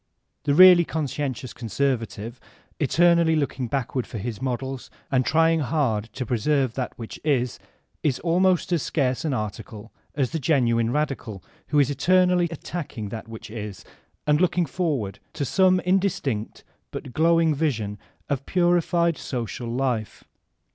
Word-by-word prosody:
The 140 -1 +2
really 180 0 +9
conscientious 140 -6 -3
conservative, 115 -1 -2 0.4
eternally 170 +2 +4
looking 135 -4 -1
back 135 +1 -2
ward 130 -3 -2
for - - -6
his 110 +2 -5
models 130 0 -3 0.2
and 130 -1 +3
trying 165 +3 +3
hard 130 -7 0
to 130 - -4
preserve 130 +2 +1
that 130 0 -4
which 115 -2 -8
is, 125 -6 0 0.4
is 140 -5 +1
almost 180 +1 +2
as 170 - +2
scarce 130 -5 0
an 150 -5 0
article 110 0 -6 0.2
as 135 -4 0
the 165 - -2
genuine 120 -6 +2
radical, 125 - -2 0.2
who 150 - 0
is 145 -1 +4
eternally 180 +4 +3
attacking 150 - -6
that 115 +2 -7
which 110 -1 -9
is 105 -4 -7 0.4
and 150 +2 +3
look 180 -1 +2
ing 175 - +3
forward 135 - -2
to 145 - -2
some 185 +6 +4
indistinct 180 - -1 0.3
but 130 - -7
glowing 165 0 +3
vision 115 -10 -2 0.3
of 140 -3 0
a 135 - -16
parified 175 -2 +2
social 120 -1 -4
life. 120 -3 -2
140 Hz, 145 wpm, -24 LUFS, 120-165 Hz, 0.4 s, really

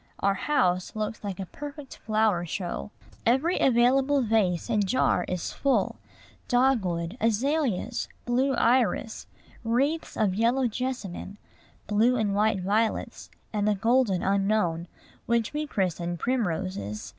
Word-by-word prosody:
Our 200 0 +2
house 185 -6 0
looks 215 +1 -4
like 195 -3 -5
a 190 - -3
perfect 285 - -9
flower 215 -5 +1
show. 175 - -4 0.3
Every 270 +10 +2
available 265 +3 +3
vase 210 -6 +1
and 215 -3 +1
jar 190 -6 +2
is 180 -2 -3
full, 275 -1 +1 0.5
dogwood, 215 -8 +1
azaleas, 240 -1 0 0.2
blue 260 +3 +1
iris, 235 -2 +1 0.4
wreaths 275 +8 0
of 210 -4 +2
yellow 235 +6 +2
jessamine, 220 -5 -5 0.5
blue 220 +4 +3
and 215 -4 0
white 210 -1 +2
violets, 215 +4 -1 0.2
and 210 -1 0
the 210 - +3
golden 225 -2 +2
unknown, 195 -4 +1 0.4
which 235 0 +1
we 300 0 -2
christen 175 - -2
primroses. 180 - -2
220 Hz, 120 wpm, -27 LUFS, 190-250 Hz, 0.5 s, available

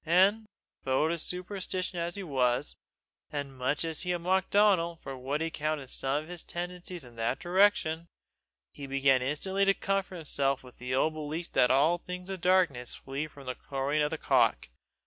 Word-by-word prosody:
and, 195 +6 +4 0.4
foe 135 +3 +2
to 170 0 -1
superstition 180 +1 -3
as 170 0 -2
he 200 - -4
was, 125 - +1 0.6
and 140 -2 -4
much 130 +5 0
as 160 -2 0
he 180 - -3
had 175 -1 +1
mocked 190 +2 +2
at - - 0
Donal 185 -5 +4
for 135 -4 -8
what 135 +4 -2
he 165 0 -1
counted 150 -4 -2
some 135 +3 0
of - - -14
his 175 -1 -3
tendencies 175 -1 -5
in 120 -2 -13
that 115 +3 0
direction, 175 -3 +2 0.6
he 140 - -8
began 135 -1 +3
instantly 190 +9 0
to 195 0 +4
comfort 195 -1 -1
himself 140 -5 0
with 125 -1 -15
the 125 +1 -2
old 155 +4 +2
belief 155 +2 -5
that 125 - +4
all 155 +6 +4
things 180 +1 -7
of - - -2
the 180 - -1
darkness 170 -10 +3
flee 140 +3 -4
from 140 -2 -14
the 130 - -2
crowing 140 +3 -1
of 150 - +2
the - - -3
cock. - - +2
155 Hz, 195 wpm, -30 LUFS, 135-180 Hz, 0.6 s, and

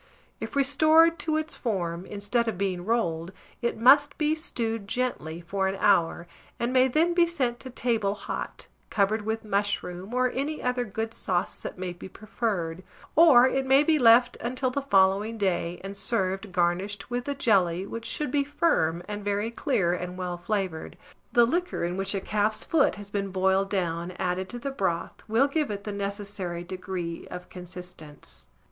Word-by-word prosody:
If - - -6
restored 310 +4 +5
to 315 -2 0
its 310 -1 -2
form, 180 -6 -2
instead 210 +4 -1
of 225 - -2
being 185 -2 -2
rolled, 175 -7 0 0.3
it 235 - -1
must 285 +5 +5
be 305 0 +2
stewed 230 - -3
gently 185 -9 -2
for 190 +3 -1
an 195 +1 -2
hour, 170 -4 +3 0.3
and 235 +2 -1
may 260 0 +5
then 325 +7 +2
be 345 -1 +4
sent 255 -8 -1
to 260 - -9
table 230 -5 0
hot, 205 - -6 0.2
covered 210 +1 +1
with 220 0 -2
mushroom, 200 -2 -2
or 250 0 +1
any 285 +4 -2
other 250 0 -1
good 220 +2 -4
sauce 180 -5 -2
that - - -6
may 180 -1 -4
be 175 - -10
preferred; 195 -5 -3 0.3
or 285 -7 +8
it 270 +1 0
may 270 +2 +6
be 310 0 +3
left 240 0 +6
until 255 +2 -2
the 280 - -1
following 205 -2 +3
day, 180 -4 -1
and 195 +1 -6
served 195 -2 -1
garnished 185 +5 -1
with 245 0 -2
the 285 - -2
jelly, 190 -9 +2
which 230 +2 -6
should 295 +3 -2
be 285 -1 +2
firm, 175 - +1
and 205 0 -5
very 205 +2 -1
clear 200 -9 +1
and 180 0 -4
well 180 -1 -3
flavoured: 180 -2 -3 0.3
the 240 -1 +6
liquor 350 - -1
in 175 +1 -2
which 195 +1 -2
a 195 - -1
calf's 215 +2 0
foot 310 -4 +3
has 205 -1 -10
been 200 -1 -2
boiled 190 +1 +1
down, 170 -3 -1
added 185 +1 -2
to 240 - -5
the 275 +3 -4
broth, 190 -9 -2
will 230 +6 +3
give 300 +1 -1
it 200 -1 -4
the 210 - -4
necessary 200 -3 -4
degree 180 -2 -5
of 180 0 -8
consistence. 180 - -10
205 Hz, 180 wpm, -27 LUFS, 185-250 Hz, 0.3 s, or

